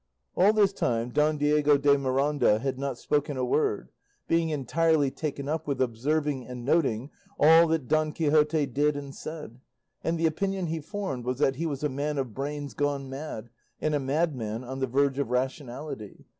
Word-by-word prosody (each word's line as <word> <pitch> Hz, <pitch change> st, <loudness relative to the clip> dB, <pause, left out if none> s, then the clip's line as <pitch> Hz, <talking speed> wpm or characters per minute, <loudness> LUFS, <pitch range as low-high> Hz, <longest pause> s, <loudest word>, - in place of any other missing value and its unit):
All 195 Hz, +3 st, +5 dB
this 205 Hz, -2 st, +3 dB
time, 120 Hz, -7 st, -1 dB
Don 150 Hz, +3 st, +2 dB
Diego 145 Hz, 0 st, +3 dB
de 140 Hz, 0 st, +4 dB
Miranda 140 Hz, -3 st, +2 dB
had 130 Hz, +2 st, -3 dB
not 140 Hz, -3 st, -3 dB
spoken 145 Hz, 0 st, -1 dB
a 130 Hz, -, 0 dB
word, 105 Hz, -, 0 dB, 0.4 s
being 165 Hz, -1 st, +2 dB
entirely 155 Hz, 0 st, +1 dB
taken 140 Hz, -2 st, -4 dB
up 160 Hz, +1 st, -2 dB
with 140 Hz, -3 st, -1 dB
observing 135 Hz, +3 st, 0 dB
and 125 Hz, -1 st, -7 dB
noting 135 Hz, -4 st, +1 dB, 0.3 s
all 165 Hz, +2 st, +7 dB
that 160 Hz, -5 st, -1 dB
Don 155 Hz, 0 st, +2 dB
Quixote 150 Hz, -1 st, +2 dB
did 145 Hz, +2 st, +1 dB
and 140 Hz, -1 st, -7 dB
said, 150 Hz, -7 st, -8 dB, 0.4 s
and 165 Hz, +1 st, 0 dB
the 165 Hz, -, 0 dB
opinion 190 Hz, +4 st, 0 dB
he 165 Hz, 0 st, -2 dB
formed 160 Hz, -, -4 dB
was 125 Hz, +1 st, -2 dB
that 135 Hz, -2 st, +1 dB
he 165 Hz, +2 st, -1 dB
was 145 Hz, -2 st, -4 dB
a -, -, +3 dB
man 145 Hz, +2 st, -2 dB
of 130 Hz, -5 st, -2 dB
brains 145 Hz, +2 st, -4 dB
gone 140 Hz, -2 st, -2 dB
mad, 135 Hz, -5 st, -6 dB, 0.3 s
and 155 Hz, -, 0 dB
a 145 Hz, -, +2 dB
madman 135 Hz, -6 st, -1 dB
on 130 Hz, +2 st, -6 dB
the 130 Hz, -, 0 dB
verge 135 Hz, +2 st, +1 dB
of 140 Hz, -, -1 dB
rationality. 130 Hz, -2 st, -4 dB
145 Hz, 185 wpm, -27 LUFS, 130-155 Hz, 0.4 s, all